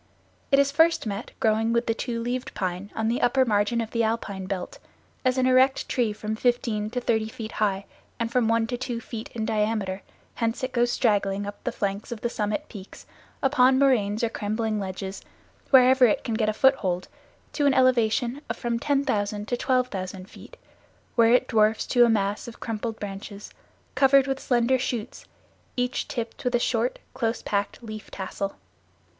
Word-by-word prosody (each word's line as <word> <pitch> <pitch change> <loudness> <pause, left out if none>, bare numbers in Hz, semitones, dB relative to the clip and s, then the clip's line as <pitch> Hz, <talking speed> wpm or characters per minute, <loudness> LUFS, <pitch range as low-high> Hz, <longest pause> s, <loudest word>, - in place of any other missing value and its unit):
It 275 - +6
is 280 0 +3
first 325 +1 +3
met 205 +1 -4
growing 225 +1 +2
with 235 +1 +1
the 225 - +1
two 235 +1 -3
leaved 250 +1 -3
pine 185 +1 -3
on 220 0 -1
the 235 +2 0
upper 260 +2 +3
margin 210 +1 +1
of 225 - -5
the 230 - 0
alpine 205 -4 -2
belt, 185 -2 -5 0.4
as 255 0 +2
an 255 - +3
erect 255 +1 +3
tree 240 -4 +1
from 215 +1 -4
fifteen 225 -3 0
to 250 +3 -2
thirty 220 -2 0
feet 220 -1 -7
high 200 -2 -1 0.3
and 230 0 -1
from 245 -2 +2
one 230 0 +2
to 245 +2 -3
two 240 -1 -3
feet 230 -1 -7
in 220 -2 -2
diameter 210 -3 -1 0.3
hence 230 +1 -2
it 255 - -1
goes 240 -1 +2
straggling 205 -4 +1
up 205 0 -8
the - - -1
flanks 200 +2 -3
of 230 -2 -5
the 235 - -1
summit 210 +8 -2
peaks, 200 -4 -11 0.4
upon 260 -1 +4
moraines 230 -6 +2
or 230 - +2
crumbling 215 0 -2
ledges, 190 0 -5 0.5
wherever 260 -1 +7
it 210 - 0
can 230 - -3
get 220 -1 +1
a - - 0
foothold, 195 -9 +2 0.5
to 290 -1 +2
an 275 - +4
elevation 245 +1 +2
of - - -3
from 235 -1 -2
10,000 215 -7 0
to 245 - 0
12,000 200 -8 -1
feet, - - -14 0.6
where 230 -1 +5
it 250 - +4
dwarfs 220 -1 +2
to 245 -2 +5
a - - +2
mass 205 -1 0
of 235 - -10
crumpled 225 0 -4
branches, 200 0 -7 0.4
covered 275 0 +5
with 270 -1 -2
slender 245 +1 +2
shoots, 245 -2 -4 0.5
each 250 0 -1
tipped 230 -2 -5
with 250 -1 +1
a - - +3
short, 240 0 0 0.2
close 235 -3 -2
packed, 200 +3 -2
leaf 215 -1 -8
tassel. 195 +1 -4
230 Hz, 185 wpm, -25 LUFS, 210-250 Hz, 0.6 s, wherever